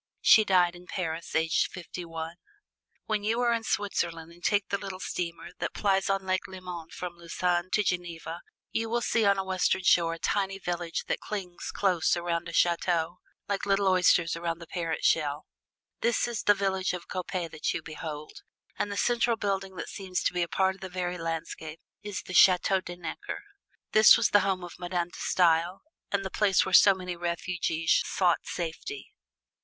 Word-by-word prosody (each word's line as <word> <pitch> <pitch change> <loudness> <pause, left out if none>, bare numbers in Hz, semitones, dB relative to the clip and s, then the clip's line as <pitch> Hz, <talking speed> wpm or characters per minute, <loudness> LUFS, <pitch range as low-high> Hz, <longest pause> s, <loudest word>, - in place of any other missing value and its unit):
She 220 - +7
died 180 -3 +3
in 175 +1 -14
Paris 170 -2 -4
aged 160 0 +2
fifty 180 0 -7
one. 165 0 -6 0.7
When 215 -2 -1
you 225 +3 +1
are 240 -1 +3
in 230 -1 -1
Switzerland 170 -6 -2
and 175 +1 -18
take 205 -2 +1
the 200 - -1
little 190 -2 -6
steamer 170 -2 -4
that - - -3
plies 195 -2 +1
on 195 -1 0
Lake 185 0 -1
Leman 180 -3 -7
from 175 -1 -7
Lausanne 175 +1 -1
to 210 - +3
Geneva, 175 -2 -3 0.3
you 225 0 -1
will 240 +1 0
see 225 -1 +2
on 200 -1 +4
the 195 - 0
western 190 0 +1
shore 165 -2 +4
a - - -10
tiny 195 +2 -1
village 175 -2 -3
that - - -1
clings 185 -4 -6
close 180 -3 +2
around 170 0 -2
a - - -6
chateau, 170 0 +1 0.3
like 200 0 -2
little 195 0 +2
oysters 180 -2 +4
around 165 0 -2
the 170 - -10
parent 165 -1 -3
shell. 150 -2 +1 0.5
This 235 +1 +1
is 235 -2 -3
the 205 - +4
village 190 -2 0
of 180 -1 -6
Coppet 180 -2 -4
that 155 - -2
you 160 - -4
behold, 155 -1 -7 0.4
and 205 - -1
the 200 - -4
central 235 +1 +2
building 195 -2 -2
that - - -5
seems 190 -2 -4
to - - +1
be 180 - 0
a 170 - +1
part 190 +2 +1
of 190 - -18
the 190 - -6
very 180 -1 -3
landscape 165 -1 -5 0.2
is 205 -2 -5
the 185 - -8
Chateau 185 +1 +5
De 175 -1 -7
Necker. 175 - -6 0.5
This 215 0 +8
was - - +2
the 205 - +6
home 190 -2 0
of 175 0 -9
Madame 175 -1 -2
De - - -12
Stael 170 +1 +2 0.3
and 195 -1 0
the 190 - -4
place 200 -3 +3
where 190 - -4
so 195 0 +8
many 180 -1 -5
refugees 170 -1 0
sought 180 -3 +1
safety. 160 -5 -5
180 Hz, 190 wpm, -28 LUFS, 170-195 Hz, 0.7 s, This